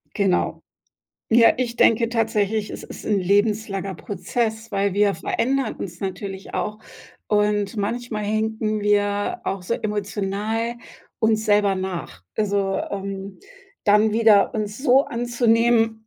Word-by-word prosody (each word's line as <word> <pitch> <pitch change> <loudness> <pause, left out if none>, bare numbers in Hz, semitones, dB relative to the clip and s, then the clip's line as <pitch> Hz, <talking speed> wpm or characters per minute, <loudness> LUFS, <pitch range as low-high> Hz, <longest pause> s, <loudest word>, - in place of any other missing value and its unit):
Genau. 195 -3 +1 0.7
Ja, 230 0 +7
ich 235 -2 -2
denke 230 0 +4
tatsächlich, 220 -2 0
es - - -7
ist - - -10
'n 210 -2 +1
lebenslanger 200 0 0
Prozess, 220 +3 -3
weil 200 -1 0
wir 205 -1 +3
verändern 255 +8 -1
uns 175 -2 -7
natürlich 195 0 -5
auch. 210 0 -2 0.5
Und, 210 0 +1
manchmal 215 +1 -3
hinken 215 0 -1
wir 205 0 +1
auch 195 -2 -3
so 230 +6 -1
emotional 210 +2 -2 0.4
uns 220 -1 +2
selber 205 -2 +3
nach. 180 - -5
Also, 200 -2 0
ähm, 195 0 -5 0.5
dann 210 +1 +4
wieder 220 -3 +4
uns 210 -1 -3
so 265 0 +4
anzunehmen, 230 -2 +1
210 Hz, 125 wpm, -22 LUFS, 200-225 Hz, 0.7 s, Ja